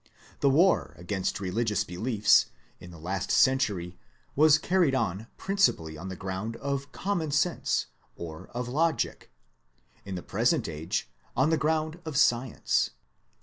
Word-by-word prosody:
The 140 - +4
war 170 +8 +3
against 95 +3 -2
religious 105 +2 0
beliefs, 105 +4 +3 0.3
in 90 - -11
the 85 - -11
last 95 +4 -3
century 105 -10 +2 0.4
was 155 +1 +6
carried 175 -5 +2
on 110 -3 -1
principally 195 - +1
on 90 +5 -7
the 95 - -5
ground 95 +4 -4
of 140 +2 -3
common 175 -5 -2
sense 150 +5 +1 0.3
or 80 -2 -8
of 120 0 -5
logic; 155 +4 0 0.7
in 95 -1 -6
the 90 - -5
present 120 - +1
age, 80 0 -3 0.3
on 145 +5 +3
the - - +4
ground 155 +1 0
of 160 -4 -4
science. 120 -1 +2
120 Hz, 140 wpm, -28 LUFS, 95-155 Hz, 0.7 s, was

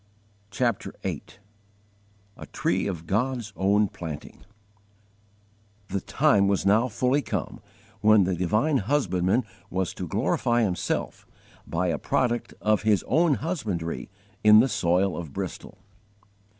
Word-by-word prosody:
CHAPTER 115 +2 -1
VIII - - -3 1.1
A - - -10
TREE 95 +3 -1
OF 85 -4 -5
GOD'S 115 +3 -1
OWN 100 +2 +2
PLANTING 80 -5 -8 1.5
THE 100 - -2
time 100 -1 +3
was 100 -1 0
now 110 +5 +4
fully 125 +5 +1
come - - -4 0.4
when 110 -1 +5
the 95 +1 0
divine 110 - +1
Husbandman 100 -3 +1 0.3
was 95 -1 -2
to 90 - -6
glorify 120 - +1
Himself 90 -5 -2 0.4
by 90 +2 -1
a - - -1
product 120 -2 -1
of 105 0 +2
His 105 -2 +2
own 155 - +3
husbandry 110 - -3 0.3
in 105 0 +8
the 125 - +5
soil 95 -4 +1
of 80 -3 -7
Bristol. 95 +1 -6
100 Hz, 125 wpm, -26 LUFS, 90-120 Hz, 1.5 s, in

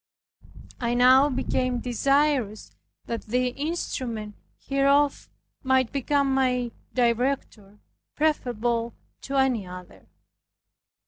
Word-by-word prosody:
I 240 -1 -1
now 260 +3 +6
became 255 -1 -1
desirous 250 - 0 0.3
that 230 - -4
the 250 +3 +1
instrument 250 -7 -4 0.2
hereof 280 +1 +1 0.3
might 260 -2 +2
become 280 0 +1
my 250 -2 +1 0.2
director, 235 -4 -1 0.4
preferable 240 -6 -1 0.3
to 275 - -5
any 255 -7 +1
other. 180 0 -11
255 Hz, 85 wpm, -25 LUFS, 235-275 Hz, 0.4 s, now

